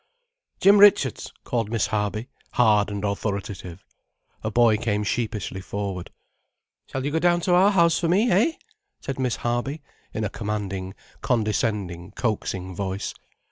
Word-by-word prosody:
"Jim 200 +1 +6
Richards," 195 - +5
called 115 -4 -1
Miss 115 0 +1
Harby, 110 +2 -2 0.3
hard 105 -4 +4
and 100 0 -3
authoritative. 100 -3 -4 0.6
A 110 - -1
boy 115 0 +4
came 105 -2 -1
sheepishly 105 -3 -2
forward. 100 -2 -4 0.8
"Shall 130 0 -4
you 145 - -1
go 160 - +1
down 175 0 +3
to 180 - +1
our 185 +3 +6
house 170 -5 +4
for 170 - 0
me, 200 +7 +3
eh?" 220 - +3 0.5
said 135 -1 -5
Miss 125 -3 0
Harby, 120 +5 -2 0.3
in 110 - -3
a 105 - -1
commanding, 100 -3 -4 0.3
condescending, 105 -6 -1
coaxing 95 -5 -2
voice. 95 +1 -3
110 Hz, 140 wpm, -24 LUFS, 100-135 Hz, 0.8 s, Jim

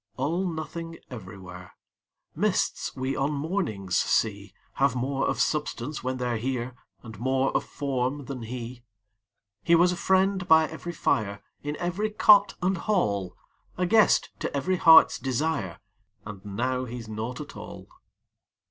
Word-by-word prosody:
All 160 +8 0
nothing 165 +1 -6
everywhere: 95 -6 -10 0.6
Mists - - 0
we 130 +1 -2
on 140 +2 0
mornings 140 - -2
see 100 -2 0 0.3
Have 135 -3 +3
more 135 +2 -1
of - - -1
substance 150 -2 -1
when 130 0 -2
they're 125 -2 -1
here 125 0 -3 0.3
And 110 -3 -10
more 130 +2 0
of - - +2
form 135 0 -2
than 130 -2 -6
he. 120 +1 -7 0.8
He 170 - +5
was 175 +2 +5
a - - -2
friend 190 +1 +1
by 160 0 +6
every 160 +2 -7
fire, 100 -10 -1 0.2
In 145 +1 -4
every 180 +5 -1
cot 210 -1 +5
and 185 0 +1
hall 100 - 0 0.4
A 180 - +1
guest 220 +4 +4
to - - -3
every 185 +6 0
heart's 160 -1 +7
desire, 130 - -2 0.5
And 100 -2 -9
now 125 +5 -2
he's 120 -2 -7
nought 110 +3 -5
at - - -8
all. - - -9
135 Hz, 145 wpm, -26 LUFS, 115-165 Hz, 0.8 s, heart's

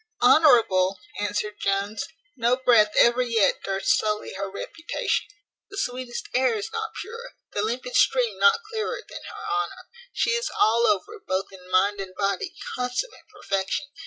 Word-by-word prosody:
"Honourable!" 225 - +5 0.2
answered 205 +1 -2
Jones; 200 +1 -1 0.3
"no 240 +1 +2
breath 230 -5 +5
ever 240 +1 +5
yet 230 -4 +2
durst 195 +6 +1
sully 210 0 -2
her 195 +1 -4
reputation. 325 - -3 0.4
The 395 - -9
sweetest 250 -7 -4
air 255 -2 +3
is 205 - -4
not 445 -1 -4
purer, 465 +3 -8 0.2
the 205 - -1
limpid 240 - -3
stream - - +3
not 465 0 +5
clearer, 440 +2 -3
than - - -9
her - - -9
honour. 410 0 -3 0.2
She 465 - +1
is 470 +1 0
all 230 +2 +4
over, 210 - 0
both 185 +1 -1
in 185 -1 -14
mind 200 +2 +2
and 185 -1 -8
body, 195 -1 -1 0.2
consummate 250 - -3
perfection. 195 +8 -2
235 Hz, 155 wpm, -25 LUFS, 200-325 Hz, 0.4 s, Honourable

